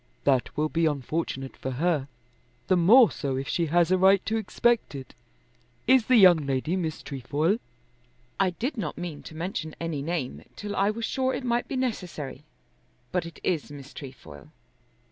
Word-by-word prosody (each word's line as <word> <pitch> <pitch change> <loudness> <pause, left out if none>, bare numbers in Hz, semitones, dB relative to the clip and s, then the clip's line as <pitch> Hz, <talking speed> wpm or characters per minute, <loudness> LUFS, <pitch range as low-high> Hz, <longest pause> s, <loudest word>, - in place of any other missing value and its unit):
"That 135 -1 +1
will 155 +1 +2
be 165 +1 +1
unfortunate 140 -2 -3
for 130 - -5
her, 170 +6 +2
and 135 -2 -5 0.6
the 185 - +3
more 215 +8 +7
so 135 -2 -3
if 135 +1 -3
she 170 +2 0
has 170 +2 +3
a 185 - +4
right 190 +1 +5
to 220 - -1
expect 225 -3 +1
it. 135 -1 -8 0.7
Is 260 -2 +4
the 255 - +5
young 175 -9 +7
lady 135 +6 0
Miss 160 -4 -3
Trefoil?" 145 - -1 0.8
"I 195 -1 +4
did 240 - -4
not 170 -9 -3
mean 170 -4 -5
to 155 - -11
mention 165 -2 -4
any 165 -4 -3
name, 155 -4 -3
till 205 0 -5
I 195 +1 +2
was 225 +2 -2
sure 260 0 0
it - - -5
might 240 -1 0
be - - -4
necessary. 180 - -3 0.7
But 180 -2 -1
it 170 - -11
is 165 -5 -1
Miss 145 0 -10
Trefoil." 80 - -11
170 Hz, 180 wpm, -27 LUFS, 145-200 Hz, 0.8 s, more